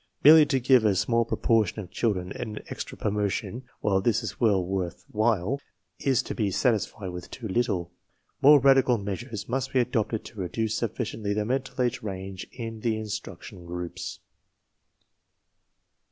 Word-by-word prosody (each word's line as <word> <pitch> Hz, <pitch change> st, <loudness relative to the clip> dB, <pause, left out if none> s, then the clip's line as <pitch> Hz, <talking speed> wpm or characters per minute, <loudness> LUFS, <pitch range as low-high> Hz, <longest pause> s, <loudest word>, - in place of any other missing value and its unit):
Merely 155 Hz, +1 st, +9 dB
to 135 Hz, -2 st, +1 dB
give 125 Hz, -1 st, +5 dB
a 105 Hz, -3 st, +3 dB
small 115 Hz, +5 st, +2 dB
proportion 115 Hz, -3 st, +1 dB
of 90 Hz, -4 st, -7 dB
children 95 Hz, -6 st, -1 dB
an 105 Hz, -2 st, -6 dB
extra -, -, -6 dB
promotion, 105 Hz, +4 st, -2 dB, 0.2 s
while 95 Hz, -2 st, +2 dB
this 115 Hz, +3 st, +1 dB
is 110 Hz, -, -5 dB
well 100 Hz, -6 st, +3 dB
worth 90 Hz, -2 st, -3 dB
while, 110 Hz, +3 st, +1 dB, 0.4 s
is 135 Hz, -3 st, +2 dB
to -, -, -5 dB
be 105 Hz, -4 st, 0 dB
satisfied 105 Hz, -2 st, 0 dB
with 90 Hz, 0 st, -8 dB
too 115 Hz, -, -6 dB
little. 95 Hz, -5 st, 0 dB, 0.5 s
More 145 Hz, +1 st, +8 dB
radical 135 Hz, -2 st, +5 dB
measures 105 Hz, +2 st, -5 dB
must 130 Hz, +2 st, -2 dB
be 130 Hz, -, +4 dB
adopted 110 Hz, -3 st, 0 dB
to 110 Hz, -, -10 dB
reduce 110 Hz, +4 st, -1 dB
sufficiently 110 Hz, -3 st, -2 dB
the 105 Hz, 0 st, 0 dB
mental 130 Hz, +3 st, -2 dB
age 125 Hz, 0 st, +1 dB
range 95 Hz, -2 st, -6 dB
in 115 Hz, -2 st, -6 dB
the 110 Hz, -1 st, 0 dB
instruction 105 Hz, -2 st, -7 dB
groups. 90 Hz, 0 st, -5 dB
110 Hz, 155 wpm, -27 LUFS, 100-120 Hz, 0.5 s, Merely